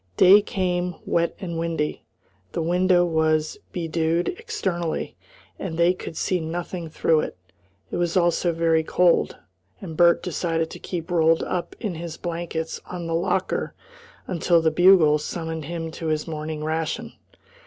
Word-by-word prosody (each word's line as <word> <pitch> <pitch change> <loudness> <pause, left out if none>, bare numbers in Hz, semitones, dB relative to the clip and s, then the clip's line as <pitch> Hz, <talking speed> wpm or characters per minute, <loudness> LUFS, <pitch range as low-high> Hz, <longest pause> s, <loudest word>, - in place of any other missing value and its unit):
Day 195 +3 +8
came, 180 -3 -1
wet 170 0 +1
and 170 -3 -4
windy. 165 -2 -2 0.5
The - - -1
window 180 +1 +3
was 155 -2 +1
bedewed 165 0 0
externally, 195 - -3 0.4
and 165 -4 -4
they 170 +1 +4
could 175 -3 -8
see 185 - 0
nothing 170 +1 -4
through 160 0 +2
it. - - -4 0.5
It - - -2
was 175 +1 0
also 175 0 +2
very 165 -1 +2
cold, 175 +1 +2 0.4
and 160 - -7
Bert 170 +1 +5
decided 165 -2 -1
to - - -8
keep 175 -1 -5
rolled 165 -1 +3
up 180 -1 -3
in 210 -6 -3
his 165 0 -6
blankets 165 -1 -4
on 175 -2 -6
the 165 - -2
locker 185 +2 -1 0.5
until 170 -1 +2
the 160 -1 +2
bugle 170 -3 +6
summoned 160 0 -4
him 165 0 -4
to 165 0 -5
his 155 0 -1
morning 155 -1 -4
ration. 160 0 -2
170 Hz, 150 wpm, -24 LUFS, 160-175 Hz, 0.5 s, Day